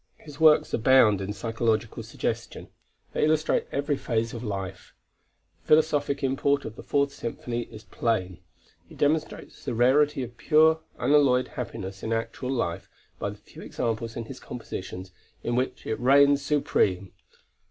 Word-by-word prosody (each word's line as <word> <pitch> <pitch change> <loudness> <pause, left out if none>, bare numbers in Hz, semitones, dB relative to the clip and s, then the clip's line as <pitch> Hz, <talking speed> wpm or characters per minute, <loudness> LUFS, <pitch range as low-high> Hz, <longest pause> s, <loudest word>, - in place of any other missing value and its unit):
His 150 -2 -13
works 155 -1 +5
abound 115 -4 +5
in 95 +1 -3
psychological 115 +1 -1
suggestion; - - -4 0.4
they - - 0
illustrate 155 0 +2
every 145 +1 0
phase 115 -3 -2
of 115 - -6
life. 95 -4 -6 0.7
The - - -32
philosophic 145 -2 +2
import 140 +1 +1
of 110 - -7
the - - -9
Fourth 140 -1 0
Symphony 120 0 -4
is 110 -1 -11
plain. 100 -6 -2 0.5
He - - -13
demonstrates 155 +2 -1
the - - -3
rarity 135 +4 +3
of 120 -1 -9
pure 160 +1 +4 0.2
unalloyed 130 -1 +3
happiness 95 -5 -6
in 110 - -4
actual 115 +3 -3
life 90 -9 -2 0.3
by - - -2
the - - -9
few - - -14
examples 115 -1 -3
in 115 - -5
his 130 +2 -9
compositions 95 -5 -7 0.3
in 120 - -1
which 130 +1 -2
it 110 - -2
reigns 140 +2 +5
supreme. 100 -10 0
125 Hz, 150 wpm, -26 LUFS, 110-140 Hz, 0.7 s, works